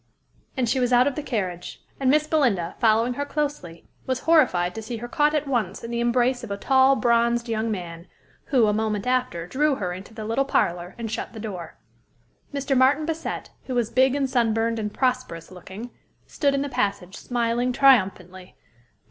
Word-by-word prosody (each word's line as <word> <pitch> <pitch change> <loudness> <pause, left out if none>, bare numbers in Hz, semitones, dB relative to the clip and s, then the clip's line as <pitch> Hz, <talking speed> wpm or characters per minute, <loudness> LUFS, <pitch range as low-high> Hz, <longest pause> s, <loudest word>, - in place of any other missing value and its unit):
And 250 -2 +1
she 255 +4 +1
was 250 -1 +1
out 245 0 +5
of 285 - 0
the 300 - -4
carriage; 185 -10 -4 0.2
and 265 -1 +2
Miss 300 +2 +4
Belinda, 245 - +1
following 230 +1 +3
her 285 - -3
closely, 285 - -4 0.2
was 260 -1 -1
horrified 245 - +3
to 225 - -6
see 230 +2 -5
her 240 +2 -6
caught 295 +4 +2
at 300 -1 -1
once 225 -8 -2
in 230 - -6
the 235 - -2
embrace 245 +1 +1
of 235 - -7
a 200 - -3
tall, 265 +4 +4
bronzed 235 -1 +2
young 225 0 -1
man, 175 -4 -6 0.4
who, 255 -6 +3
a 210 - +2
moment 215 -1 -1
after, 250 -10 -1
drew 285 +8 +1
her 180 -7 -3
into 190 +4 -10
the 220 -1 -7
little 230 +5 +1
parlor, 175 -9 -1
and 230 -2 -5
shut - - -4
the 220 - -8
door. 190 -7 -7 0.7
Mr. 275 -1 -1
Martin 270 +4 +4
Bassett, 325 0 -4 0.2
who 255 - -3
was 235 -2 0
big 260 +1 +3
and 280 -1 0
sunburned, 230 -2 +1
and 210 -1 -3
prosperous 255 -11 -2
looking, 190 +6 -9 0.3
stood 280 -2 0
in 275 - 0
the - - -3
passage, 200 -7 -2
smiling 240 +1 -1
triumphantly. 190 -9 +2
235 Hz, 190 wpm, -24 LUFS, 205-265 Hz, 0.7 s, out